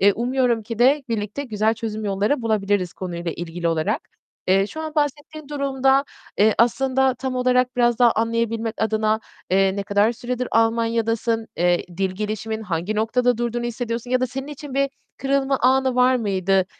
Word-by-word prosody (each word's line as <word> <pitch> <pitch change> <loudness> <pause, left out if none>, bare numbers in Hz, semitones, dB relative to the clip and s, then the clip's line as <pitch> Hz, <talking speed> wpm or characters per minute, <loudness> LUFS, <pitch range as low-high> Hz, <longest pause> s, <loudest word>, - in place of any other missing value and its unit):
Eee, 200 +1 +6
umuyorum 245 0 0
ki 220 +1 -6
de 275 +4 +4
birlikte 215 +3 -3
güzel 220 -2 +1
çözüm 220 -2 -5
yolları 205 +7 0
bulabiliriz 205 -5 0
konuyla 175 -2 -5
ilgili 170 0 -4
olarak. 165 - 0 0.5
Eee, 195 +1 +4
şu 315 - -7
an 315 -1 -5
bahsettiğin 295 0 -2
durumda 275 -1 +2 0.3
eee, 215 +1 +5
aslında 265 +2 +2
tam 260 +1 -4
olarak 250 0 +2
biraz 240 -1 +3
daha 240 -2 +5
anlayabilmek 230 0 -1
adına, 220 0 +1 0.3
eee, 195 +1 +3
ne 200 - -1
kadar 205 +3 +2
süredir 245 +1 -4
Almanya'dasın? 225 0 +1
Eee, 175 +1 +2
dil 190 0 0
gelişimin 215 +2 -4
hangi 185 +1 -2
noktada 240 +2 +1
durduğunu 240 0 -2
hissediyorsun 240 0 -4
ya 255 - +2
da 255 - +1
senin 265 +2 -6
için 290 -2 -8
bir 275 0 +1 0.3
kırılma 275 0 +1
anı 260 0 +3
var 250 +1 +4
mıydı 195 -4 +1
230 Hz, 165 wpm, -22 LUFS, 210-255 Hz, 0.5 s, Eee